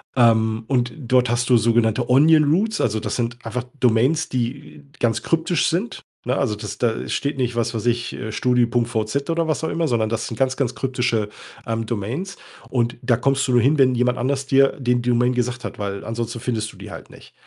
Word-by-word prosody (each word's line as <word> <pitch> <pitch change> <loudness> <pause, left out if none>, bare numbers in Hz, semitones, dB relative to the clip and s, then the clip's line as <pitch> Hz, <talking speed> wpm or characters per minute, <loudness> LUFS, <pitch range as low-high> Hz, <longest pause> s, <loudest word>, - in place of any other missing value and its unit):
ähm, 110 -2 +3
und 125 -3 0
dort 125 -3 +2
hast 120 +1 0
du 125 - +6
sogenannte 115 +1 +1
Onion 150 +3 +5
Roots, 215 +5 0
also 110 -1 0
das - - -3
sind 120 0 -3
einfach 120 +2 -3 0.2
Domains, 125 +7 +2
die 115 - -4
ganz 115 -2 0
kryptisch 165 0 +1
sind, 190 +8 -2 0.2
ne? 125 +2 0
Also 115 -6 0
das 105 0 -7
da 115 -2 -1
steht 140 0 -2
nicht, 125 -2 -1
was 120 0 -1
weiß 115 0 -4
ich, 120 0 0
äh, 110 - -5
Studi.vz 120 +2 0
oder 165 0 0
was 155 0 -1
auch 160 - -1
immer, 165 -1 0
sondern 110 -4 0
das 115 0 -2
sind 115 - -6
ganz, 130 0 0
ganz 130 -4 -1
kryptische, 120 -5 -1 0.4
ähm, 115 0 -2
Domains. 125 - -4 0.3
Und 120 -2 0
da 120 -2 +2
kommst 135 +1 +1
du - - 0
nur 120 - +5
hin, 140 +6 +3
wenn 130 -2 +4
jemand 125 +1 +1
anders 135 +2 -1
dir 135 0 +4
den 125 -2 +1
Domain 125 +1 +2
gesagt 125 0 -2
hat, - - -7
weil 100 -1 -4
ansonsten 115 +2 -4
findest 110 -3 -3
du - - -17
die - - -10
halt - - -10
nicht. - - -16
120 Hz, 210 wpm, -21 LUFS, 115-135 Hz, 0.4 s, du